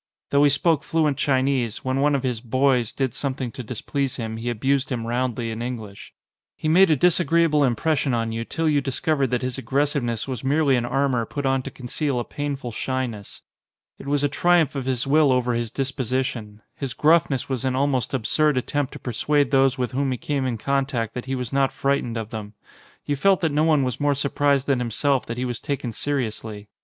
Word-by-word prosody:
Though 140 0 +4
he 145 - +6
spoke 145 +1 +2
fluent 155 -4 +1
Chinese, 130 -4 0
when 130 +1 0
one 145 +1 +3
of 135 - -1
his 125 -4 -2
"boys" 130 -1 +1
did 130 -4 -2
something 130 -3 -3
to 130 - -7
displease 130 +3 -3
him 110 -2 -4
he 115 +2 -3
abused 135 +4 0
him 120 -3 -2
roundly 120 -1 -1
in 110 +1 -5
English. 110 -5 -6 0.5
He - - -3
made 180 +4 +6
a 155 - +5
disagreeable 165 -1 +3
impression 135 +3 +1
on 115 -1 0
you 115 +1 -3
till 165 +7 -2
you 145 -2 +3
discovered 140 +1 0
that 125 0 -1
his 130 +1 -3
aggressiveness 135 -4 -1
was 130 -2 -5
merely 140 0 +3
an 120 -1 0
armour 130 -3 0
put 140 -1 -4
on 135 0 +2
to - - -6
conceal 130 +1 -3
a - - -1
painful 140 -4 -4
shyness. 120 -4 -4 0.6
It - - -10
was 145 0 +1
a - - +4
triumph 175 +1 +2
of 135 -3 -4
his 130 -2 0
will 145 0 +4
over 125 -1 +1
his 120 -1 -1
disposition. 130 -5 -3
His 135 -4 -5
gruffness 150 -4 +3
was 130 -3 -2
an 130 -1 0
almost 135 -3 0
absurd 140 +4 +1
attempt 145 +2 -1
to - - -8
persuade 140 +3 0
those 135 -1 +3
with 125 -2 -2
whom 135 +1 0
he 125 - -2
came 140 0 -2
in 120 -2 -2
contact 135 -3 -1
that 125 - -5
he 135 0 -2
was 125 -2 -5
not 135 -1 +2
fright 140 +1 0
ened 115 -1 -4
of 110 -1 -5
them. 105 -2 -7 0.5
You 145 - 0
felt 190 +6 +3
that 160 -3 +1
no 150 +2 +2
one 155 -4 +3
was 125 -2 -2
more 145 -1 +2
surprised 140 0 +1
than 135 -3 +1
himself 130 +3 0
that 115 - -4
he 125 - -1
was 120 -2 -4
taken 135 -4 -3
seriously. 110 -5 -3
130 Hz, 210 wpm, -23 LUFS, 120-145 Hz, 0.6 s, he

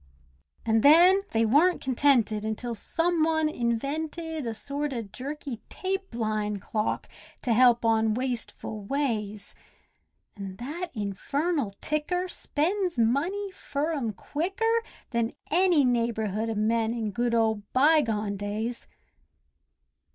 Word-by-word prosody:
An' 225 -1 +3
then 350 - +7
they 225 0 +2
wer'n't 310 +11 +4
contented 245 -5 +2
until 220 +2 -3
some 330 +8 0
one 315 -1 +2
invented 305 +4 -2
A 225 - -2
sort 285 +3 -3
o' 235 -2 -3
jerky 255 +3 -6
tape 380 -7 -3
line 215 -2 -1
clock, 215 +2 -2 0.4
to 245 - +2
help 240 0 +5
on 220 -1 +3
wasteful 240 -4 -4
ways. 215 -5 -2 0.8
An' 195 -2 -7
that 300 - -5
infernal 230 - -1
ticker 355 +5 -1
spends 360 +2 -1
money 330 - +1
fur 305 -3 -3
'em 250 -8 -1
quicker 390 - -1 0.3
Than 235 -1 0 0.2
any 345 -4 +4
neighbourhood 230 -3 0
o' 225 - -2
men 225 +2 +1
in 220 -3 -2
good 240 +2 0
old 220 -2 0
bygone 230 -8 +3
days. 215 +4 -3
245 Hz, 120 wpm, -27 LUFS, 220-310 Hz, 0.8 s, then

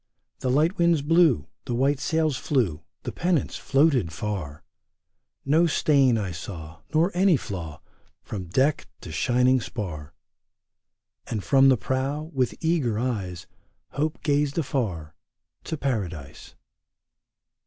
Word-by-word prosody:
The 130 - -2
light 155 +8 +2
winds 170 -4 +3
blew, 160 - +4 0.2
The 120 - -2
white 135 +3 +2
sails 160 -1 +1
flew, 115 - 0 0.2
The - - -4
pennants 175 -3 0
floated 135 - +2
far; 85 -5 -5 0.8
No 160 +5 +4
stain 140 -6 +3
I 100 -4 -2
saw. 80 -1 -8
Nor 165 +4 +3
any 185 -2 +4
flaw. 85 - -7 0.4
From 95 -4 -6
deck 135 - +1
to 85 - -8
shining 125 +8 +2
spar! 80 - -6 1.1
And 105 -4 -3
from 135 -1 +5
the 130 - +5
prow, 140 +6 -2
with 130 -3 0
eager 155 -10 +1
eyes, 100 -8 -3 0.5
Hope 155 +2 -2
gazed 145 -1 +1
afar 100 - -2 0.3
— - - -51
to 160 - -3
Paradise. 90 - -4
130 Hz, 125 wpm, -25 LUFS, 95-150 Hz, 1.1 s, from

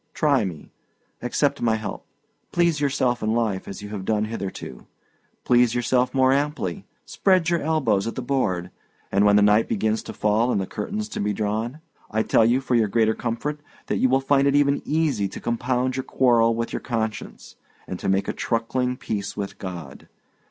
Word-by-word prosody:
Try 140 -8 +2
me; 85 -5 -7 0.5
accept - - 0
my 115 -2 +2
help. 110 -1 -6 0.4
Please 170 -4 +2
yourself 130 -3 +1
in 110 +1 0
life 110 -5 -1
as 100 - -7
you 105 - -7
have 105 -2 -5
done 105 +1 0
hitherto; 110 -3 -6 0.6
please 120 -1 +3
yourself 125 +1 +1
more 130 0 +3
amply, 150 +7 -2 0.2
spread 185 -4 +2
your 170 - +1
elbows 130 -10 +1
at 115 - -4
the 130 - -4
board; 95 -10 -1 0.4
and 100 +1 +3
when 105 0 +5
the 105 - +5
night 105 +2 +4
begins 110 +1 0
to - - -8
fall 110 +4 +1
and - - +1
the 95 - -1
curtains 215 - -4
to - - -5
be 105 +1 0
drawn, 110 +7 -2 0.3
I 110 +1 0
tell 110 - +4
you, 125 +3 +2
for 130 - -2
your 115 -3 +4
greater 110 +1 +2
comfort, 125 +7 -3 0.3
that - - -1
you 130 - +3
will 135 +1 +3
find 140 0 +3
it 140 - +3
even 145 0 +3
easy 145 -10 +1
to 95 - -8
compound 125 +2 -1
your 130 - -2
quarrel 115 -4 +3
with 115 +1 -3
your - - -1
conscience, 110 -3 -4 0.3
and 90 - -6
to - - -2
make 95 +1 +1
a - - -1
truckling 125 +2 -1
peace 100 -4 -4
with 100 -1 -5
God. 85 -7 -8
115 Hz, 195 wpm, -24 LUFS, 105-135 Hz, 0.6 s, when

